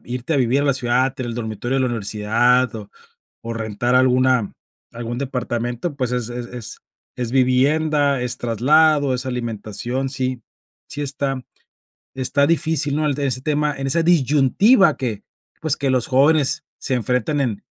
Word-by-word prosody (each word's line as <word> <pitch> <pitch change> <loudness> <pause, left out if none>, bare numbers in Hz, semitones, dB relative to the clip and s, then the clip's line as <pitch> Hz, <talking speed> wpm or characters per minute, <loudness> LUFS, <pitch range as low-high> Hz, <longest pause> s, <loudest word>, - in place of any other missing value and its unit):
irte 125 +5 -4
a - - +2
vivir 130 +3 +2
a - - -1
la 140 - +3
ciudad, 125 +1 +1
tener 130 -3 -5
el 115 - -4
dormitorio 120 +2 -3
de - - +1
la 130 - +2
universidad 115 +2 +1
o 105 -2 -8 0.5
o 115 0 -5
rentar 115 +2 -2
alguna 130 -3 +3 0.4
algún 120 +1 -5
departamento, 125 +2 -3
pues, 125 -3 -2
es 120 -1 -2
es 120 0 -5
es 120 -3 -7 0.4
es 120 -2 -4
vivienda, 140 +2 +2
es 125 - -1
traslado, 145 +5 +3
es 130 +1 -2
alimentación, 120 +2 -3
sí 130 -2 -2 0.5
sí 145 - -5
está 135 -2 -3 0.7
está 140 +2 +1
difícil, 160 -3 +1
¿no? 155 -1 +1
En 145 +1 -2
ese 130 -2 -1
tema, 150 0 0
en 135 0 -3
esa 165 +4 +2
disyuntiva 160 - +4
que, 115 -6 -4 0.4
pues, 155 -3 0
que 140 -1 -2
los 130 -3 +2
jóvenes 140 +2 +3
se 130 - -3
enfrenten 125 +4 0
en 115 -6 -2
130 Hz, 160 wpm, -20 LUFS, 120-140 Hz, 0.7 s, disyuntiva